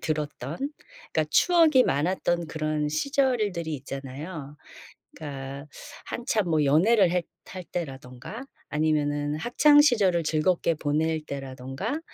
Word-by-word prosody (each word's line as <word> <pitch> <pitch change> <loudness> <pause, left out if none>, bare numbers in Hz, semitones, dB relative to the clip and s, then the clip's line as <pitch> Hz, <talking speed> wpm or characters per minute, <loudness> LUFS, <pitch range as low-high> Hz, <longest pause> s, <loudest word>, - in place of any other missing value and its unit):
들었던 150 -2 -3 0.6
그러니까 - - +2
추억이 325 -7 +5
많았던 170 +2 0
그런 155 -1 -2
시절들이 210 - 0
있잖아요. 140 +3 -7 0.6
그러니까 140 -1 -7 0.4
한참 220 -6 -1
뭐 155 -2 +2
연애를 185 +7 +4
했 180 -2 0 0.2
할 185 -1 -7
때라든가 135 - -7 0.2
아니면은 150 -1 0
학창시절을 240 - +4
즐겁게 165 +2 +1
보낼 155 +2 0
때라든가 135 - -5
155 Hz, 280 characters per minute, -26 LUFS, 145-190 Hz, 0.6 s, 추억이